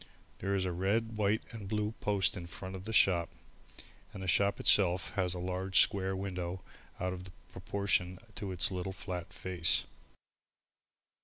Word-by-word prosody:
There 100 +1 0
is 95 -1 +1
a 90 - -1
red, 105 +6 0
white 105 +1 +1
and 110 -4 -7
blue 105 +1 -1
post 100 -2 +2
in 90 -3 -6
front 95 +2 -7
of 95 0 -8
the 110 - -4
shop 90 -5 +4 0.8
and 95 - -7
the - - -4
shop 100 +2 +3
itself 90 -2 +4
has 90 -2 +1
a - - -4
large 95 +1 +1
square 95 -2 +3
window 90 -2 -4 0.4
out 90 0 -1
of 90 0 -8 0.2
proportion 95 -2 -1 0.2
to 100 -1 -5
its 90 +1 +3
little 95 +1 -3
flat 90 -2 -5
face. 90 -3 +1
95 Hz, 160 wpm, -32 LUFS, 90-100 Hz, 0.8 s, shop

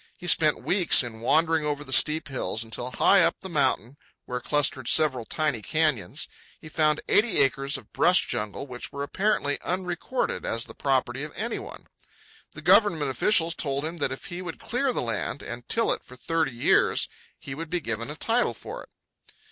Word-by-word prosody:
He - - -11
spent 155 -3 +3
weeks 180 -7 +5
in 115 -2 -7
wandering 160 +5 +2
over 145 -1 -2
the 130 - -2
steep 155 +3 +4
hills, 125 -4 -1
until, 115 +2 -4
high 195 +9 +4
up 165 0 +2
the 190 - -7
mountain, 135 - +1 0.3
where 125 0 -4
clustered 140 -4 +1
several 135 -7 +3
tiny 150 -6 -1
canyons, 140 - -1 0.3
he 155 - -12
found 155 -1 +1
eighty 220 0 +3
acres 135 +1 +2
of 125 -5 -15
brush 180 +1 +4
jungle 105 +5 -3
which 125 -3 -7
were 140 - -5
apparently 145 -3 0
unrecorded 180 +7 -3
as 115 +1 -2
the 115 - -12
property 130 -1 -1
of 150 - -6
any - - -3
one. - - -10 0.7
The 150 - -10
government 170 -6 +4
officials 170 - +3
told 140 -3 -2
him 165 +2 -5
that 145 -4 0
if 130 - -7
he 175 +1 -6
would 175 -3 -7
clear 260 +3 -1
the - - -2
land 115 +4 -3
and 120 0 -8
till 230 - +2
it - - -7
for 125 - -13
thirty 160 +3 -1
years 120 0 +2 0.3
he 135 - -8
would 160 +3 -7
be 180 - 0
given 115 -4 -3
a 150 - -6
title 230 +8 0
for - - -8
it. - - -15
150 Hz, 190 wpm, -26 LUFS, 130-170 Hz, 0.7 s, weeks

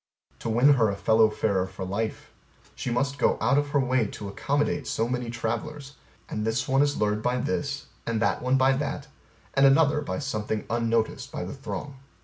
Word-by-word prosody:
To - - -4
win 125 +6 +5
her 115 -5 +3
a 100 - -2
fellow 110 +2 +4
farer 100 -3 0
for 95 - -6
life, 110 +4 -3 0.4
she - - -4
must 140 +4 -1
go - - +3
out 140 - +3
of 145 - -1
her 145 0 +1
way 130 -4 +2
to 100 - -7
accommodate 145 +5 -1
so 115 - 0
many 125 -1 -2
travelers: 120 +5 -4 0.3
and 105 - -3
this 110 +2 -1
one 135 +1 +3
is 145 0 +2
lured 105 0 +1
by 125 +2 0
this, 140 +2 -2 0.2
and 115 -1 0
that 115 - +1
one 130 +1 +2
by 130 0 +4
that, 140 0 -3 0.5
and 135 - +3
another 150 +1 +4
by 145 - -3
something 110 -6 -3
unnoticed 115 -1 0
by - - -4
the 90 - -5
throng. 140 0 -6
125 Hz, 195 wpm, -26 LUFS, 110-140 Hz, 0.5 s, win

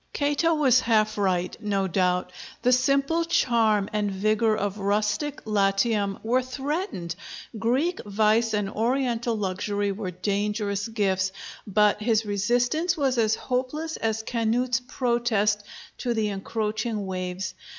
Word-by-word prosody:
Cato 295 +3 +1
was 265 -5 +4
half 215 -3 +2
right, 185 -3 0
no 200 -3 0
doubt. 180 0 0 0.3
The 250 - +4
simple 275 +6 +2
charm 230 - +2
and 210 -1 0
vigor 215 +3 +1
of 205 0 -2
rustic 210 +8 -1
Latium 200 0 +1
were 245 +3 +2
threatened; 265 - -3 0.4
Greek 265 +11 0
vice 215 +2 +2
and 205 -1 0
Oriental 235 +2 0
luxury 205 +1 -1
were 195 -1 -4
dangerous 200 +2 -1
gifts: 190 -4 0 0.4
but 210 +1 +3
his 225 0 +2
resistance 245 - +1
was 265 -4 +1
as 220 -1 +3
hopeless 270 +6 -3
as 220 0 -1
Canute's 235 +2 0
protest 235 -5 0 0.4
to 240 -2 -1
the 215 -1 0
encroaching 215 +1 -2
waves. 185 0 -4
215 Hz, 125 wpm, -25 LUFS, 200-250 Hz, 0.4 s, was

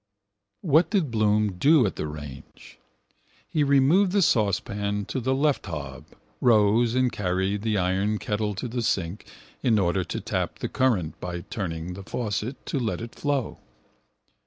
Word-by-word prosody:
What 160 0 +3
did 180 - 0
Bloom 105 -3 +1
do 150 -3 +5
at 95 - -2
the - - -3
range? 75 -2 -10 0.7
He 155 - +1
removed 145 +8 +4
the 200 -2 +4
saucepan 100 - 0
to 130 - -3
the 130 +2 0
left 140 -5 +1
hob, 70 -6 -6 0.3
rose 115 +1 +4
and 130 -1 +2
carried 95 -1 -1
the 110 -1 0
iron 95 +3 +1
kettle 105 0 -2
to 110 - -4
the 120 +1 -3
sink 95 -4 -2 0.3
in 115 -4 +3
order 95 -1 +1
to - - -4
tap - - -3
the - - -4
current 105 -12 0
by 90 -1 -5
turning 90 -6 -5
the 95 - -8
faucet 110 +4 -4
to 140 - -2
let 115 -3 -2
it 115 0 -7
flow. 140 -5 -2
105 Hz, 160 wpm, -25 LUFS, 95-130 Hz, 0.7 s, do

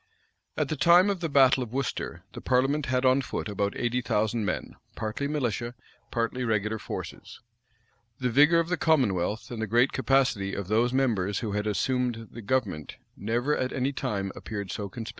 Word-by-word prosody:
At - - 0
the 155 - -1
time 175 +6 +5
of 195 - -3
the 165 -2 -2
battle 135 -2 +5
of 120 -3 -5
Worcester 125 -9 -3
the - - -8
parliament 135 +3 +1
had 130 0 +1
on 130 +1 +5
foot 130 - -4
about 100 -1 -2
eighty 125 +1 0
thousand 110 -1 0
men, - - -3 0.2
partly 110 +6 -3
militia, 120 -5 -2 0.3
partly 120 +2 -1
regular 110 -1 0
forces. - - -7 0.8
The 125 -2 0
vigor 150 +7 +6
of 165 0 -1
the 180 - 0
commonwealth, 110 - +1
and 115 -2 -4
the 110 - -1
great 120 +5 +3
capacity 130 -7 +1
of 100 -2 -5
those 115 +3 +3
members 110 -7 +1
who 110 -4 -3
had 105 +1 -1
assumed 115 +2 -1
the 120 - -8
government, 100 - -2 0.2
never 120 +8 0
at 130 - -1
any 135 +1 -1
time 100 -6 -2
appeared 100 -3 -5
so 100 -1 -4
conspicuous. 110 +2 -7
120 Hz, 180 wpm, -27 LUFS, 105-135 Hz, 0.8 s, vigor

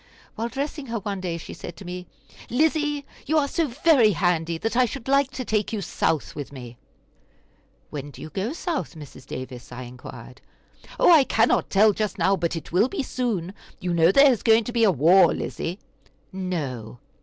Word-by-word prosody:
While 230 +2 -3
dressing 280 +3 -4
her 230 0 -2
one 200 -2 -4
day, 175 -2 -3
she 165 - -9
said - - -9
to 200 - -11
me: 180 0 -6 0.4
"Lizzie, 295 +1 +1 0.2
you 315 - +2
are 290 -2 +3
so 325 +2 0
very 260 -4 +4
handy 170 -2 0
that 225 +7 -3
I 255 0 +5
should 245 +1 -7
like 275 0 +3
to 255 - -4
take 215 -2 0
you 220 - -2
South 160 -4 -1
with 145 -2 -7
me." 125 -3 -9 1.2
"When 145 -1 -6
do 140 - -13
you 155 - -8
go 195 - -2
South, 330 - -3
Mrs. 145 -4 -12
Davis?" 130 -1 -8
I 125 +1 -7
inquired. 125 0 -11 0.6
"Oh, - - +6
I 315 -5 +8
cannot 230 -2 +2
tell 210 +2 +5
just 210 0 -2
now, 195 - +3
but 170 -1 -2
it 165 - -7
will 190 +8 +3
be 345 -1 -3
soon. 220 -9 -2 0.3
You 180 -1 -2
know 165 +1 +5
there 275 +5 +7
is 240 - -1
going 225 0 +5
to 240 - -5
be 230 -2 +4
war, 180 +2 +5
Lizzie?" 175 +3 -4 0.6
"No!" 140 - -4
200 Hz, 190 wpm, -24 LUFS, 165-255 Hz, 1.2 s, I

